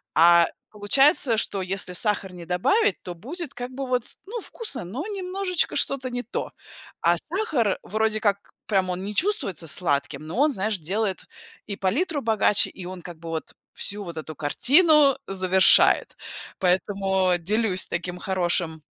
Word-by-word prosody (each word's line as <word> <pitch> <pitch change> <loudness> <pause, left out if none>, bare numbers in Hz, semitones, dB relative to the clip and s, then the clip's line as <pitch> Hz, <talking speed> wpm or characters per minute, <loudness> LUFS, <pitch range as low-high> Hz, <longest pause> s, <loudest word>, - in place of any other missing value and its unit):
А, 170 +1 +6 0.2
получается, 235 - +3
что 200 -3 -1
если 185 0 -3
сахар 200 -1 -1
не 175 -1 -9
добавить, 405 - +1
то 180 - -6
будет, 300 - -7
как 245 +1 -6
бы 270 0 -5
вот, 250 -2 0 0.2
ну, 455 +4 -6
вкусно, 405 - -5
но 255 - -5
немножечко 375 -2 -1
что-то 260 -2 0
не 245 0 -4
то. 235 - -4 0.5
А 170 +1 +4
сахар, 310 - -1
вроде 220 +1 0
как, 200 -2 -1 0.2
прям 190 -3 +1
он 180 +1 -3
не 205 +1 -5
чувствуется 285 - 0
сладким, 150 -2 -1
но 170 - -6
он, 295 +2 +4
знаешь, 205 -3 -2
делает 195 +4 -2 0.4
и 200 -1 -5
палитру 285 - 0
богаче, 220 -2 +2
и 185 - -11
он, 185 -1 -7
как 175 -2 -9
бы 165 0 -8
вот, 160 -1 -5 0.2
всю 205 0 -3
вот 170 -3 -8
эту 155 -1 -6
картину 285 - +4
завершает. 190 -1 +4 0.4
Поэтому, 190 0 +1
делюсь 200 +1 +1
таким 175 +1 -4
хорошим 175 -3 -1
200 Hz, 155 wpm, -24 LUFS, 180-265 Hz, 0.5 s, А